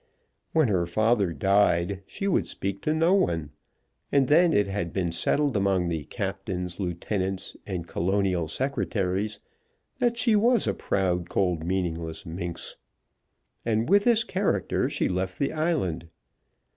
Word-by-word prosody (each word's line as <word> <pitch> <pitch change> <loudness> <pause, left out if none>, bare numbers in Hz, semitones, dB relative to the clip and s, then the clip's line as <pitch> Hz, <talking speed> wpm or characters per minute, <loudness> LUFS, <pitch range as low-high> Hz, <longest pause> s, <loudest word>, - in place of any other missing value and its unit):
When 160 -4 +3
her 90 -5 +1
father 110 0 +2
died 95 0 +2
she 195 - -4
would 195 - +1
speak 100 0 -4
to 155 - 0
no 165 +3 +3
one; 85 - +1 0.6
and 140 -2 +3
then 170 +4 +5
it 105 - +3
had 95 -4 -3
been 90 -3 -1
settled 140 - +1
among 95 -3 +1
the 80 -3 -3
captains, 95 0 -4
lieutenants, 95 +1 -3
and 90 -4 -4
Colonial 90 -1 0
secretaries 100 - -1 0.6
that 240 -2 +1
she 235 -2 +3
was 230 +2 +3
a - - +1
proud, 90 -3 -1
cold, 90 -4 0
meaningless 85 -2 -3
minx. 85 +1 -5 0.9
And 115 +3 0
with 200 +1 +5
this 235 -1 +4
character 190 - 0
she - - 0
left 90 0 -2
the 140 - -1
island. 155 - -1
95 Hz, 140 wpm, -26 LUFS, 90-140 Hz, 0.9 s, then